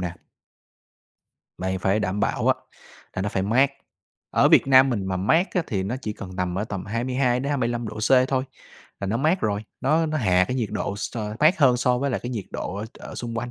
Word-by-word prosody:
nè. 90 -1 -3 1.4
Mày 95 0 -2
phải 95 +3 +1
đảm 105 0 -1
bảo - - 0
á - - +5 0.6
là 95 - -1
nó 105 - -1
phải 95 -1 -1
mát. 130 +7 +3 0.6
Ở - - +4
Việt - - +5
Nam 130 0 +6
mình 100 -5 -1
mà 95 -1 -1
mát 160 - +2
á 180 - +2
thì 95 -3 -1
nó 105 +7 -3
chỉ 105 - -3
cần 95 -2 -9
nằm 90 -1 -1
ở 105 - -1
tầm 100 -4 -5
22-25 125 +1 0
độ 110 - -7
C 110 - -1 0.2
thôi 130 -1 0 0.6
là 100 - -2
nó 110 +4 0
mát 160 +8 +1
rồi, 105 0 -1 0.2
nó 155 +5 +2
nó 155 0 -1
hạ 95 -5 +3
cái 125 - -1
nhiệt 115 -5 -1
độ 100 -1 -3
s 105 - -5 0.2
mát 160 +5 +5
hơn 130 -4 +5
so 125 0 +1
với 140 +1 -1
lại - - -2
cái 120 - -5
nhiệt 110 -6 -4
độ 95 - -4
ở 105 - -4
ở - - -9
xung 115 -1 -5
quanh, 120 +1 -4
115 Hz, 225 wpm, -24 LUFS, 100-130 Hz, 1.4 s, Nam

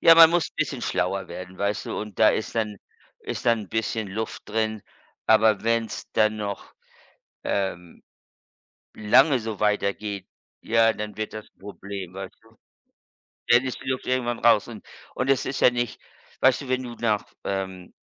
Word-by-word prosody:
ja, 165 - +8
man 165 0 +9
muss 175 -2 +1
bisschen - - -2
schlauer 95 +1 -1
werden, 90 0 -9
weißt 100 +1 -1
du? - - -3
Und 105 -2 -8
da - - +7
ist - - -1
dann 105 -3 -1 0.5
ist - - -5
dann 115 -2 +4
'n 100 - -9
bisschen 110 -1 -2
Luft 110 +3 -4
drin, 110 -1 -1 0.4
aber 110 -1 +5
wenn's 115 0 -1
dann 110 0 +3
noch, 100 -2 -5 0.7
ähm, 90 -3 -3 0.9
lange 130 +6 +4
so 110 -2 -5
weitergeht, 105 -1 -1 0.3
ja, 115 0 +4
dann 105 -1 -6
wird 110 0 -4
das 110 0 -8
Problem, 100 -2 -8
weißt 95 0 -7
du? 115 0 -23 0.9
Dann 120 +1 +6
ist 130 - -4
die - - -7
Luft 130 -1 -2
irgendwann 120 -2 0
raus 115 -2 +4
und 115 -3 -10 0.3
und 130 - -1
es 135 - +2
ist 135 - -3
ja - - +7
nicht 120 -1 -3 0.4
weißt 130 -1 +4
du, 135 - -9
wenn 130 0 0
du 120 -2 -7
nach, 110 -3 0 0.2
ähm 95 -2 -4
110 Hz, 170 wpm, -25 LUFS, 100-120 Hz, 0.9 s, man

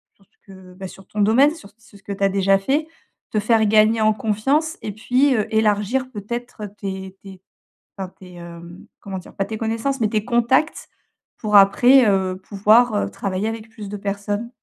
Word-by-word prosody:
sur - - -28
ce 445 - -43
que 185 -1 -14
bah, 190 0 -7
sur 195 +1 -14
ton 210 - -3
domaine. 240 +8 +4
Sur 265 -12 -14
c - - -43
sur 225 -2 -18
ce - - -29
que 200 - -5
tu 200 - -4
as 195 - +4
déjà 195 0 +2
fait, 285 +10 -1 0.4
te 215 - 0
faire 220 +1 +2
gagner 215 +1 +4
en 215 0 +4
confiance 270 +10 -1
et 210 - -4
puis, 255 +6 +1
heu, 215 - 0
élargir, 220 +4 +1
peut-être, 235 0 -6
tes 190 -1 -6
tes 190 -2 -12 0.6
enfin, 190 -2 -5
tes, 180 -1 -13
hem, 170 0 -11
comment 195 -1 -6
dire? 180 - -15
Pas 195 - -1
tes 220 - -6
connaissances 230 +4 -2
mais 215 - +2
tes 215 0 -1
contacts 250 +5 +1 0.5
pour, 210 -2 +3
après, 245 +7 +6
heu, 190 -2 0
pouvoir, 215 +3 +3
heu, 205 - -1
travailler 195 +1 -3
avec 225 0 -7
plus 215 -2 -10
de 205 - -5
personnes. 205 +3 -4
210 Hz, 200 wpm, -21 LUFS, 195-235 Hz, 0.6 s, après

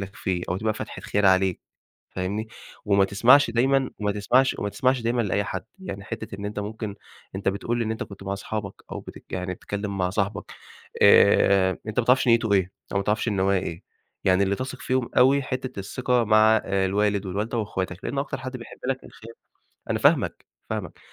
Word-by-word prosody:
لك 95 0 -7
فيه 90 -2 -2
أو 90 - 0
تبقى 110 +2 -1
فاتحة - - -7
خير 100 -1 +1
عليك 95 -1 +3 0.5
فاهمني، 100 +4 -3 0.4
وما 100 -1 +4
تسمعش 120 +8 +5
دايمًا 130 +3 +2
وما 105 -1 0
تسمعش 125 +6 +2
وما 100 - -2
تسمعش 130 +2 +1
دايمًا 120 +1 +1
لأي 100 -1 0
حد. 95 -1 -5
يعني 100 - -7
حتّة 110 -1 -6
إن 100 - -6
أنت 105 0 -4
ممكن 105 0 -5 0.4
أنت 95 0 0
بتقول 115 +4 -2
إن 110 -1 -1
أنت 110 - -3
كنت 100 -1 -11
مع 100 0 -2
أصحابَك، 100 0 -5
أو - - -4
بتك - - -12
يعني 90 0 -2
بتتكلِّم 100 +2 -5
مع 90 -1 +1
صاحبك 100 +1 -2 0.5
آآ 95 -1 +5
أنت 110 +3 -1
ما 120 - +1
تعرفش 130 +1 +4
نيّته 115 -2 +4
إيه 95 -1 +2 0.2
أو 100 - +2
ما 100 - 0
تعرفش 105 +4 0
النوايا 95 -2 +2
إيه، 85 -2 -6 0.4
يعني 95 +1 +4
اللي 100 0 +1
تثق 130 +3 -6
فيهم 130 -2 0
أوي، 135 +3 +5
حتّة 130 -3 -4
الثقة 125 +4 0
مع 110 +1 +5
آآ 95 -1 +1
الوالد 100 +1 +1
والوالدة 105 +5 -2
وإخواتك، 95 -3 -3
لإن 140 - -3
أكتر 140 -1 -2
حد 130 0 -6
بيحب 115 - -12
لك 135 0 -2
الخير 115 +1 -13 0.6
أنا - - 0
فاهمك، - - +2 0.2
فاهمك، - - -5
105 Hz, 195 wpm, -25 LUFS, 100-120 Hz, 0.6 s, تسمعش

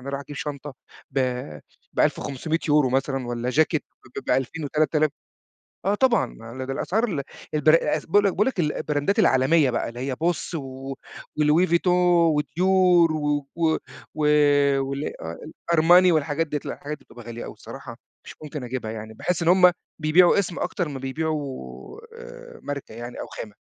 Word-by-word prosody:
أنا 130 - -9
أروح 140 0 -3
أجيب 145 0 -9
شنطة 145 -3 -6 0.4
ب 135 - -2 0.7
ب1500€ 150 0 +1
مثلًا، 135 -1 -1
والّا 120 +1 -2
جاكيت 155 +2 +2 0.4
ب - - -22
ب2000 135 +5 -1
و3000 155 +1 +1 0.8
آه 200 +2 +2
طبعًا، 250 0 +2
لا 115 +3 -8
ده 135 - -3
الأسعار 220 - -1
ال 165 -10 -2 0.3
الب 150 - -1
باقول 165 +5 +3
لك 195 - +3
باقول 210 +6 +1
لك 260 -8 -2
البراندات 150 +4 0
العالمية 140 -3 +4
بقى، 120 - -1
اللي 120 +1 -9
هي 130 0 -2
Boss 170 +4 -2
و 135 -2 -6 0.5
وLouis 155 +5 +4
Vuitton 170 +2 +2 0.5
وDior 150 +4 -3 0.5
و 150 -2 0
و 165 -2 +2 0.4
و 155 -1 0 0.6
و 135 +1 -3
آآ 145 - -3
آه 80 +1 -6 0.4
الArmani 175 +3 +6
والحاجات 155 0 0
ديّة، 150 0 -2
لأ، - - -3
الحاجات 150 +1 -6
دي - - -24
بتبقى 120 -1 -13
غالية 120 0 -7
أوي - - -8
بصراحة - - -10 0.3
مش - - -10
ممكن 150 -2 -6
أجيبها، 120 -3 -4
يعني 110 0 -7
باحِسّ 170 +10 -2
إن 165 - -1
هُم 180 0 +7 0.3
بيبيعوا 175 +5 +5
اسم، 180 -3 -3
أكتر 175 -5 -2
ما 140 -2 -6
بيبيعوا 135 - -5 0.2
آآ - - -11
ماركة 140 -5 -6
يعني 120 +2 -8
أو - - -5
خامة. 105 - -8
150 Hz, 165 wpm, -24 LUFS, 130-165 Hz, 0.8 s, هُم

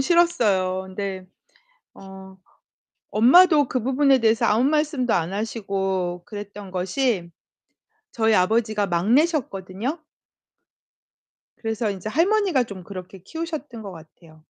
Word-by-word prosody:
싫었어요. 215 - +2
근데 190 0 -5 0.7
어 190 0 -12 0.7
엄마도 290 - +6
그 255 - -2
부분에 270 +2 +3
대해서 230 0 +2
아무 225 +4 +2
말씀도 295 -4 +1
안 170 +1 -1
하시고 195 -4 -3
그랬던 205 -2 -9
것이 185 0 -1 0.8
저희 220 -1 +2
아버지가 215 +2 +1
막내셨거든요. 225 - 0 1.6
그래서 225 -2 -2
인제 195 +1 -5
할머니가 350 - +2
좀 200 -5 -9
그렇게 185 0 -9
키우셨던 310 - -6
것 200 -2 -8
같아요. 160 -1 -16
215 Hz, 265 characters per minute, -23 LUFS, 190-265 Hz, 1.6 s, 엄마도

